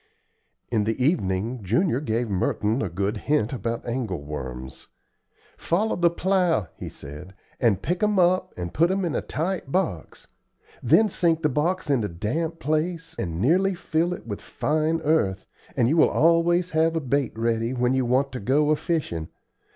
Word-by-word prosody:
In 110 -3 +1
the 110 +3 -1
evening 120 - 0
Junior 120 - +1
gave 120 -3 -1
Merton 105 +4 0
a - - -1
good 100 +5 -2
hint 135 -1 0
about 115 0 -3
angle 115 - -3
worms. 65 -3 -7 0.7
"Follow 205 +6 0
the 175 -1 +3
plow," 170 - +1
he - - -7
said, 75 +7 -10 0.2
"and 110 -6 +2
pick 175 +1 -1
'em 210 -1 +2
up 185 +1 +3
and 85 0 -5
put 170 +3 +3
'em 190 0 0
in 165 - -2
a - - 0
tight 165 -3 -3
box. 150 - -2 0.6
Then 215 - +5
sink 170 -4 +1
the 150 - +3
box 165 +7 0
in 135 -6 +2
a - - 0
damp 150 - -3
place 160 +2 -2
and 85 -2 -3
nearly 185 - +3
fill 170 0 0
it 180 - -6
with 105 -3 -5
fine 155 +2 -1
earth, 145 -12 +1 0.3
and 120 - +3
you 155 +5 +4
always 170 +2 +3
have 160 -2 +1
bait 140 -5 0
ready 115 0 0
when 125 0 +1
you 130 -1 +2
want 130 +3 +1
to 125 - -5
go 145 +8 +2
a - - +4
fishing. 145 - -2
140 Hz, 170 wpm, -25 LUFS, 105-165 Hz, 0.7 s, Then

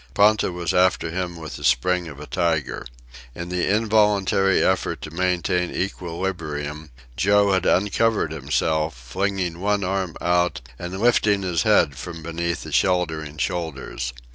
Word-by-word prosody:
Ponta 105 -1 +4
was 85 -3 -2
after 90 -2 +2
him 90 0 -3
with 80 -2 -7
the - - -10
spring 90 +8 +2
of 75 -3 -9
a 75 - -7
tiger. 85 -4 -1 0.5
In 85 0 -6
the 90 0 0
involuntary 105 -3 +3
effort 95 -1 +1
to 75 - -7
maintain 90 0 0
equilibrium, 80 -5 -4 0.3
Joe 100 +3 +3
had 95 -1 +1
uncovered 105 +3 +2
himself, 80 -2 0
flinging 90 +7 -2
one 100 +1 +1
arm 95 -2 -2
out 90 -2 +1 0.2
and 90 +2 -5
lifting 105 -3 +3
his 90 -3 0
head 70 -2 +3
from 85 0 -7
beneath 85 +1 -3
the - - -8
sheltering 80 -5 0
shoulders. 75 -6 -3
90 Hz, 140 wpm, -23 LUFS, 80-95 Hz, 0.5 s, Ponta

